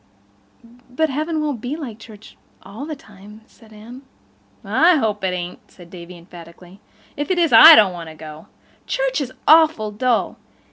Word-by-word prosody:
"But 310 +4 -2
heaven 310 +3 -3
won't 285 -7 -4
be 250 +5 -5
like 250 -9 -9
church—all 215 +2 -14
the 310 - -6
time," 210 -3 -17
said 225 -1 -22
Anne. 225 +5 -13 0.6
"I 310 - +3
hope 215 -8 -2
it - - 0
ain't," 180 0 -6
said 175 -2 -18
Davy 175 0 -12
emphatically. 175 +2 -16 0.3
"If 290 +4 -5
it 370 - -1
is 335 -3 +1
I 320 +1 +10
don't 200 -7 +3
want 170 -2 -9
to 160 - -13
go. 155 0 -12 0.4
Church - - -2
is 260 -2 -6 0.2
awful 315 -9 +3
dull. 240 +3 -2
220 Hz, 160 wpm, -19 LUFS, 185-300 Hz, 0.6 s, I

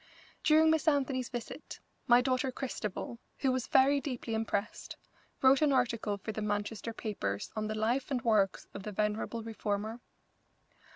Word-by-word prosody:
During 315 +1 +6
Miss 320 +1 +1
Anthony's 270 -4 +1
visit 240 +5 -7 0.3
my 240 0 +7
daughter 255 +1 0
Christabel, 235 -3 -4 0.2
who 265 - +1
was 255 -1 -1
very 275 +1 +4
deeply 250 -5 -4
impressed, 220 -2 -2 0.5
wrote 265 +2 +6
an 300 -2 +4
article 230 -5 +1
for 210 +3 -5
the 215 - -4
Manchester 205 +2 -2
papers 105 - -3
on 215 0 -1
the 215 - -3
life 235 +5 0
and 255 -4 -1
works 210 -4 +2
of 200 - -6
the 210 - -5
venerable 215 +2 -1
reformer. 220 0 -3
230 Hz, 155 wpm, -32 LUFS, 215-265 Hz, 0.5 s, my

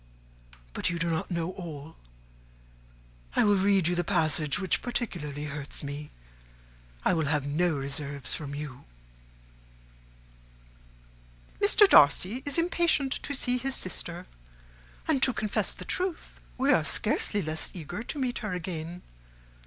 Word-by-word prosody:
But - - -1
you 170 - -2
do 170 0 0
not 160 - -2
know 170 -1 -2
all. 160 -4 -8 1.4
I - - +4
will 205 -2 +4
read 195 -2 +3
you 175 - +1
the 175 0 0
passage 155 -3 +1
which 190 -3 0
particularly 165 - -3
hurts 150 -1 -5
me. 145 +1 -6 1.0
I - - +4
will 160 -3 +1
have 150 -1 0
no 160 +3 +1
reserves 140 0 -2
from 145 -2 -5
you. 145 -3 -7 2.8
'Mr. 410 0 +6
Darcy 185 - +5
is 285 - +1
impatient 335 -5 +2
to 285 - -1
see 250 -1 +1
his 270 +2 -2
sister; 175 -1 -1 0.8
and 280 -4 +2
to 260 - +6
confess 215 -2 -1
the - - -9
truth, 365 -2 -2 0.2
we 270 +2 +3
are 160 - +3
scarcely 205 +5 +2
less 155 0 -1
eager 175 +4 -6
to 250 - -6
meet 255 -3 -1
her 210 -4 -4
again. 175 0 -5
175 Hz, 135 wpm, -28 LUFS, 150-240 Hz, 2.8 s, Mr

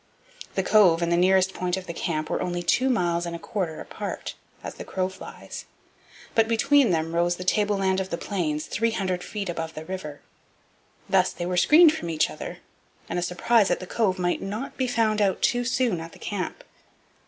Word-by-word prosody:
The 190 - +1
Cove 180 -5 +5
and 170 - 0
the - - +4
nearest 190 +1 +3
point 180 0 -1
of 190 - -6
the 170 - -5
camp 155 -3 -3
were - - -1
only 175 0 -2
two 255 +9 +2
miles 175 -7 +1
and 170 - -4
a - - -4
quarter 170 -2 -3
apart, - - -6 0.3
as - - -5
the - - -8
crow 185 -1 -2
flies. 190 - -9 0.7
But 225 -1 +3
between 275 +3 +4
them 165 -1 0
rose 175 +1 +2
the 180 - -6
tableland 195 -1 +1
of 190 0 -3
the 170 - -2
Plains, 155 -7 -2
300 195 -5 -1
feet 205 -2 -5
above 165 -2 -4
the 155 - -7
river. 160 -5 -6 0.9
Thus 185 -1 +3
they 175 - -5
were 180 +1 -1
screened 305 - +7
from 170 - -5
each 160 -2 +1
other, - - -7 0.5
and 175 - -1
a - - -2
surprise 190 +5 +2
at - - +1
the 185 - -7
Cove 195 -1 0
might 175 -1 0
not 210 +7 -5
be 260 - -1
found 220 -3 +1
out 195 -3 +1
too 245 0 +2
soon 245 -6 +1
at 165 0 -8
the - - -13
camp. 205 - -4
185 Hz, 200 wpm, -25 LUFS, 175-215 Hz, 0.9 s, screened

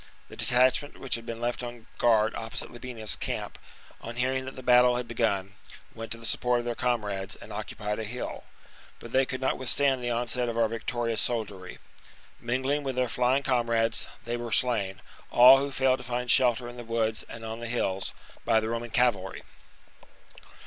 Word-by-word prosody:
The - - -10
detachment 130 +4 +2
which 135 - -4
had 115 0 0
been 115 0 -5
left 120 +1 -2
on 120 -2 -7
guard 110 -2 +4
opposite 115 +2 -5
Labienus's 120 -3 -4
camp, - - -4 0.4
on 115 +1 -7
hearing 130 +1 0
that 130 - -7
the 130 - -9
battle 125 0 +6
had 125 -1 -3
begun, 100 -5 0 0.4
went 115 0 -8
to 115 - -3
the 115 - -9
support 125 +1 +1
of 120 - -3
their 120 - -1
comrades 105 -5 -1
and - - -11
occupied 105 +1 -4
a - - -2
hill; 120 +4 -5
^ - - -28 0.5
but - - -11
they 130 0 +3
could 130 0 -4
not 130 - 0
withstand 130 0 +1
the 120 - -1
onset 120 +1 0
of 115 - -4
our 115 -1 +4
victorious 115 0 -2
soldiery. 100 -6 -3 0.6
Mingling 130 +5 0
with 135 -2 -3
their 130 0 +1
flying 125 +4 +2
comrades, 115 -4 +1 0.2
they 120 +1 -2
were 120 -1 -5
slain 100 -8 +1 0.2
— - - -24
all 130 +2 +10
who 140 +1 -2
failed 130 -1 +2
to - - -8
find 125 0 0
shelter 120 0 +5
in 120 0 -9
the 120 - -7
woods 115 -1 -1
and 115 -1 -8
on 110 +1 -5
the 120 - -5
hills 95 -5 -1 0.2
— - - -22
by 110 - +4
the 110 0 -3
Roman 115 +1 -3
cavalry. 115 -5 +1
120 Hz, 195 wpm, -28 LUFS, 115-125 Hz, 0.6 s, all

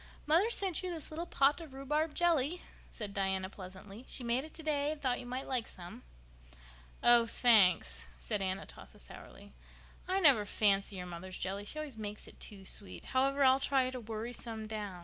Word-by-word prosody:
"Mother 335 +9 +4
sent 385 -7 +3
you 370 - -2
this 330 -4 -6
little 335 +3 -4
pot 285 +3 +3
of 300 -5 -10
rhubarb 300 +3 -1
jelly," 340 -1 +2 0.3
said 210 -3 -7
Diana 190 -1 -1
pleasantly. 195 +4 -10
"She 255 - -4
made 240 +2 +1
it 310 - -10
today 300 -2 -1
and 310 - -5
thought 255 -3 0
you 245 - -7
might 255 +2 -4
like 250 -4 -1
some." 175 -1 -10 1.0
"Oh, 240 -1 +7
thanks," 180 - +4
said 130 - -3
Aunt 190 0 -1
Atossa - - -12
sourly. - - -11 0.5
"I 375 +1 +1
never 280 - +6
fancy 200 -1 +1
your 180 -1 -5
mother's 180 +1 -7
jelly—she 200 +8 -4
always 300 -6 -4
makes 210 0 -6
it - - -15
too 195 -2 -8
sweet. 200 +1 -1
However, 275 +2 +3
I'll 260 0 +6
try 265 -2 +2
to 255 - -5
worry 225 +1 -5
some 225 -2 -6
down. 210 -4 -5
240 Hz, 185 wpm, -33 LUFS, 200-290 Hz, 1.0 s, Oh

